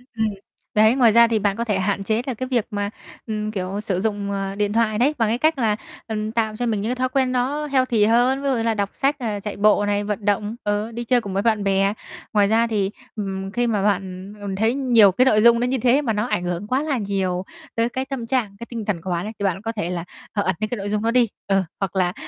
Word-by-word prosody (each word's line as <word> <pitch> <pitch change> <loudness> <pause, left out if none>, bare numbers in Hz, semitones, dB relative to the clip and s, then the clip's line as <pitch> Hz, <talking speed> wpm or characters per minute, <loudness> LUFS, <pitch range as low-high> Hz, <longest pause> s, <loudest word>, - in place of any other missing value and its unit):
Ừm. 220 0 +1 0.5
Đấy, 220 +3 +6
ngoài 245 -4 +5
ra 235 +1 +7
thì 225 -1 +1
bạn 200 -1 +1
có 230 - -2
thể 210 -5 0
hạn 195 +1 -1
chế 220 +3 0
là 260 - -1
cái 255 +3 -5
việc 235 -4 +2
mà, 205 -1 -2 0.4
ừm, 215 -1 -2
kiểu, 190 -1 -3
sử 195 -4 -1
dụng, 205 -2 -2
à, 195 0 -3
điện 205 0 0
thoại 220 -2 +2
đấy 275 +5 +3
bằng 225 -3 +2
cái 230 - +1
cách 315 +3 +2
là, 220 -5 +2 0.3
ừm, 215 -1 -3
tạo 220 -2 -1
cho 245 - -2
mình 220 -4 0
những 215 - -2
cái 250 - 0
thói 255 0 0
quen 260 -1 +1
nó 265 +4 0
healthy 255 -6 +2
hơn, 245 +4 +3
ví - - -1
dụ 265 - +2
như 230 - -1
là 230 0 +2
đọc 200 -2 -1
sách, 280 +2 +1
ờ, 215 -5 -2
chạy 205 0 -6
bộ 205 0 +4
này, 205 0 0
vận 210 0 -4
động, 205 +2 0
ờ, 205 +2 -1
đi 235 +1 -5
chơi 245 +1 +2
cùng 200 -3 -6
với 195 - +1
bạn 220 -3 +2
bè. 195 0 +2 0.4
Ngoài 205 -2 +4
ra 225 +2 +3
thì, 205 -3 0 0.2
ừm, 195 -2 -4
khi 240 +3 0
mà 210 -4 0
bạn, 195 -1 -2
ừm, 200 -1 -4
thấy 220 +4 +2
nhiều 240 -7 +5
cái 250 +8 +3
nội 215 -5 +4
dung 235 +1 +6
nó 245 - +1
như 260 +1 0
thế 250 +4 +3
mà 230 -6 -1
nó 210 +1 0
ảnh 180 - -1
hưởng 175 +3 -3
quá 260 +5 +1
là 295 -4 -1
nhiều 190 -3 -1 0.3
tới 230 +1 +1
cái 260 +2 -3
tâm 265 -3 -5
trạng, 230 -6 -1
cái 235 - -6
tinh 230 -3 -5
thần 195 -5 -2
của 185 +1 -4
bạn 175 +2 -1
ấy 215 - -5
thì 200 - -3
bạn 190 0 0
có 225 - -3
thể 205 -6 -3
là, 175 -2 -3 0.3
ờ, 205 - 0
ẩn 190 - 0
những 215 0 -2
cái 245 - -3
nội 200 +1 -4
dung 210 0 0
đó 230 - +2
đi, 245 -2 +4 0.2
ờ, 195 -1 +2 0.2
hoặc 195 -1 -3
là 180 -1 +1
215 Hz, 285 wpm, -22 LUFS, 200-235 Hz, 0.5 s, ra